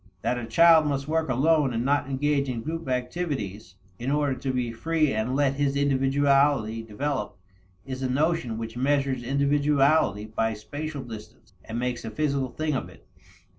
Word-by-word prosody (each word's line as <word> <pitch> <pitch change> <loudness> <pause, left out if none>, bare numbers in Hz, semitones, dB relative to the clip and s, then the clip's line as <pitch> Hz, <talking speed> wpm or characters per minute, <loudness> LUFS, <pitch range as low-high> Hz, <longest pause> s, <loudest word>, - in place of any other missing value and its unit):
That 125 - 0
a 115 - -6
child 160 +5 +6
must 140 -1 -2
work 160 -1 0
alone 140 0 +2
and 115 +2 -1
not 140 0 +1
engage 140 0 0
in 115 -3 -3
group 165 0 -4
activities 125 - -3 0.2
in 125 - -3
order 145 -1 +1
to 130 +1 -3
be 125 -2 -1
free 155 +4 0
and 110 +4 -1
let 140 -1 +1
his 140 -1 +1
individuality 135 -4 +2
develop, 115 0 -3 0.5
is 130 -1 -6
a 130 - -1
notion 140 -4 0
which 115 0 -6
measures 135 0 +1
individuality 140 -3 +2
by 110 0 -1
spatial 145 +6 -6
distance 110 -1 -11
and 115 - -6
makes 125 -1 -2
a 110 - -4
physical 140 +2 -1
thing 155 +5 -2
of 130 - -3
it. - - -18
135 Hz, 170 wpm, -26 LUFS, 120-145 Hz, 0.5 s, child